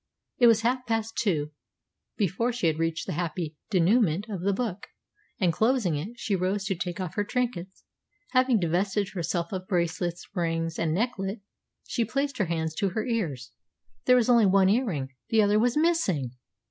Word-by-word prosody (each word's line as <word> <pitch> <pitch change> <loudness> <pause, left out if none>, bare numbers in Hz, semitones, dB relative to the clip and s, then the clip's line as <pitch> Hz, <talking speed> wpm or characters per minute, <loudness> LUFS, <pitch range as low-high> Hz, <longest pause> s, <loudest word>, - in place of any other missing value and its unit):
It 240 - +7
was 225 -1 +5
half 250 +2 0
past 225 -1 -1
two 155 -9 0 0.7
before 215 +4 0
she 240 -6 -3
had 160 -1 +1
reached 165 -2 -1
the - - -3
happy 165 -1 -3 0.2
dénouement 195 0 +3
of 185 - -4
the 200 +2 +1
book, 205 -2 -3 0.5
and, 180 -4 +2
closing 220 - +2
it, 170 +11 -4
she 215 -4 -1
rose 190 +2 -1
to 195 -1 -1
take 175 0 -4
off 185 -3 -4
her 205 - 0
trinkets. 205 -5 -3 0.5
Having 255 -4 +3
divested 190 +4 0
herself 170 -1 -2
of 185 -1 -5
bracelets, 175 -1 -1
rings, 165 -3 -1
and 160 -1 0
necklet, 205 -1 -2 0.5
she 235 - 0
placed 275 +4 -2
her 200 - +2
hands 160 -2 -2
to 200 -2 +1
her 215 +4 -3
ears. 155 - -2 0.5
There 250 - +6
was 245 -3 +3
only 235 -4 +5
one 190 0 +4
ear 240 +6 +3
ring; 140 -9 -3 0.2
the 220 -1 +4
other 205 +1 +3
was 245 +4 +2
missing! 300 - +1
195 Hz, 180 wpm, -27 LUFS, 170-230 Hz, 0.7 s, It